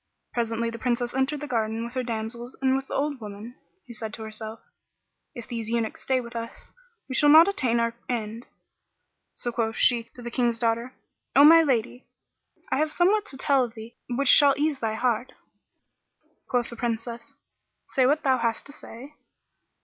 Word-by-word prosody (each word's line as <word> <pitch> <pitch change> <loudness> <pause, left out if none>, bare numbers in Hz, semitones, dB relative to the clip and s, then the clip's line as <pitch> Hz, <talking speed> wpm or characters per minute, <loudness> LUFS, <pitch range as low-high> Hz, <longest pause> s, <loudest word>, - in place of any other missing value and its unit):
Presently 230 -1 -1
the 230 - -8
Princess 240 0 -1
entered 265 +3 0
the 295 - -5
garden 225 -2 -1
with 235 - -8
her 255 - -1
damsels 235 +1 -5
and 265 0 +2
with 270 0 -3
the - - -5
old 285 -2 -1
woman, 210 +3 -8 0.3
who 245 - -10
said 220 -1 -5
to 220 - -8
herself, 220 +1 -7 0.8
"If 240 - -8
these 230 -3 -4
eunuchs 230 -1 -2
stay 260 -1 +1
with 235 -1 -9
us, 230 0 -7 0.3
we 265 - -5
shall 295 +3 +4
not 320 +4 +9
attain 255 -12 +1
our 230 0 0 0.2
end." 230 -1 -4 0.9
So 240 - -3
quoth 225 -1 -1
she 235 -2 +3
to 245 - -11
the 240 - -6
King's 240 -2 +1
daughter, 230 +2 -1 0.4
"O 280 - +8
my 330 +2 +9
lady, 250 -4 -1 0.6
I - - +2
have 305 +1 +1
somewhat 400 +6 +2
to 265 - -6
tell 270 -2 +3
thee 225 0 -11
which 260 +3 -1
shall 280 +1 +7
ease 295 -1 0
thy 220 -2 -1
heart." 240 +1 -1 1.2
Quoth 245 -2 0
the - - -7
Princess, 235 +3 -4 0.5
"Say 260 -1 +3
what 295 +3 +2
thou 260 -3 +3
hast 230 -1 -1
to - - -9
say." 275 0 -11
240 Hz, 180 wpm, -26 LUFS, 230-265 Hz, 1.2 s, not